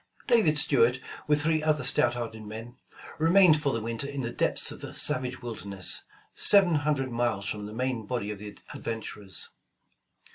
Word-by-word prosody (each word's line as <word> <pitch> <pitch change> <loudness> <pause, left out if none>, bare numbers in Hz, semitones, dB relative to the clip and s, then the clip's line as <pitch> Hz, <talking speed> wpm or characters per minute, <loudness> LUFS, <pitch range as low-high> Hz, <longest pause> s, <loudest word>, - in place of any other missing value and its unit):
David 220 - +3
Stuart, 125 -4 +3 0.3
with 150 -1 +2
three 160 -1 +1
other 155 -2 +1
stout 120 -2 +3
hearted 115 -2 -6
men, 110 +3 -9 0.4
remained 165 -1 +5
for 140 -2 0
the 115 - -2
winter 115 +4 -2
in 140 -1 -4
the 120 -1 -4
depths - - 0
of - - -10
a - - -8
savage 125 0 -1
wilderness, 100 -5 -2 0.3
seven 195 -4 +6
hundred 145 -3 0
miles 115 -4 -1
from 105 0 -4
the - - -9
main 125 -3 -2
body 105 -4 -3
of 105 - -7
the 105 0 -9 0.2
ad - - -10
venturers. 105 -4 -5
125 Hz, 175 wpm, -27 LUFS, 110-150 Hz, 0.4 s, seven